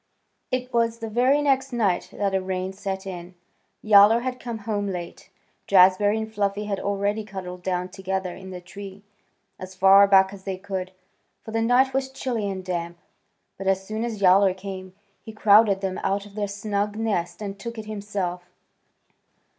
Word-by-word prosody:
It 255 0 -3
was 230 -1 +1
the 225 -1 -6
very 260 +6 +3
next 270 -1 +1
night 210 -7 0
that 200 -1 -2
a 190 - +1
rain 185 0 -3
set 195 -1 -5
in. 180 -1 -8 0.5
Yowler 215 +2 +6
had 255 0 -4
come 235 -2 -5
home 205 -2 -1
late. 180 -3 -6 0.4
Jazbury 195 +2 +5
and 220 0 -5
Fluffy 205 0 -1
had 200 -2 -2
already 200 +2 -1
cuddled 185 -3 -8
down 180 0 -2
together 190 -1 -4
in 190 0 -10
the 180 -1 -8
tree, 200 +2 -10 0.6
as 185 0 -9
far 195 +1 +7
back 190 0 +5
as 195 -1 -11
they 190 -1 -4
could, 190 -1 -5 0.5
for 220 - -8
the 225 0 0
night 250 +3 +3
was 265 0 -1
chilly 240 -6 -3
and 190 -1 -5
damp. 170 -1 -4 0.6
But 195 - -4
as 190 0 +1
soon 215 +2 -3
as 220 -4 -4
Yowler 190 0 +5
came 190 -1 -8 0.3
he 220 - -10
crowded 210 -2 +5
them 190 -1 -3
out 195 +1 0
of 205 - -14
their 205 -1 -2
snug 205 0 -2
nest 180 -6 -2
and 200 -1 -6
took 235 +3 -7
it 220 - -6
himself. 200 -4 -4
200 Hz, 180 wpm, -24 LUFS, 190-220 Hz, 0.6 s, far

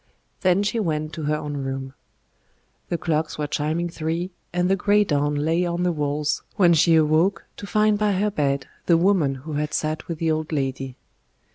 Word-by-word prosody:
Then 185 +1 +3
she 215 +3 0
went 155 -5 -2
to 155 - -5
her 150 +1 +1
own 150 -1 -4
room. 135 -1 -4 1.0
The 170 - 0
clocks 160 -2 -1
were 150 - -1
chiming 155 +4 -1
three, 170 +2 -3 0.2
and 180 +1 +1
the 195 - +3
grey 205 +2 +3
dawn 145 -4 0
lay 160 +4 +1
on 175 0 -1
the 180 - +2
walls, 150 -1 -1
when 175 -3 +5
she 165 +1 +5
awoke 160 +5 +2
to 200 - -7
find 215 0 +2
by 210 -1 +2
her 205 +3 +1
bed 140 -6 0 0.2
the 170 - +5
woman 170 -6 +2
who 155 - -5
had 150 +1 -1
sat 155 0 -2
with 170 - -4
the 160 0 0
old 155 0 -2
lady. 135 -3 -2
160 Hz, 190 wpm, -23 LUFS, 150-180 Hz, 1.0 s, when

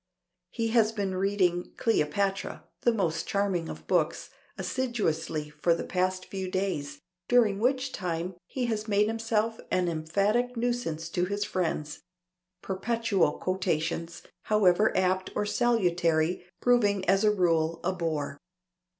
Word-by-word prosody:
He 225 +2 -2
has 220 -1 +4
been 200 -4 -2
reading 185 -2 +1
"Cleopatra" 195 0 0 0.2
(that 240 -1 +3
most 165 -5 -1
charming 195 -4 0
of - - -8
books) - - 0 0.3
assiduously 165 -12 -2
for 170 +2 +2
the - - -4
past 185 0 -1
few 190 -1 -4
days, 150 -7 -2 0.3
during 225 -5 +4
which 260 +3 +1
time 180 -3 -3
he 255 -2 -2
has 220 -2 -2
made 205 0 +3
himself 225 0 -1
an 180 -1 +1
emphatic 200 +10 0
nuisance 230 -10 -1
to 180 - 0
his 200 +2 -2
friends: 160 -6 -2 0.6
perpetual 215 0 +1
quotations, 170 -2 -2 0.2
however 210 -1 +4
apt 185 0 +1
or 210 - 0
salutary, 175 -8 +1 0.2
proving 205 -6 +3
as 195 +3 +4
a 215 - +5
rule 165 -5 +2
a 185 +1 0
bore. 155 -5 -3
190 Hz, 130 wpm, -28 LUFS, 170-220 Hz, 0.6 s, a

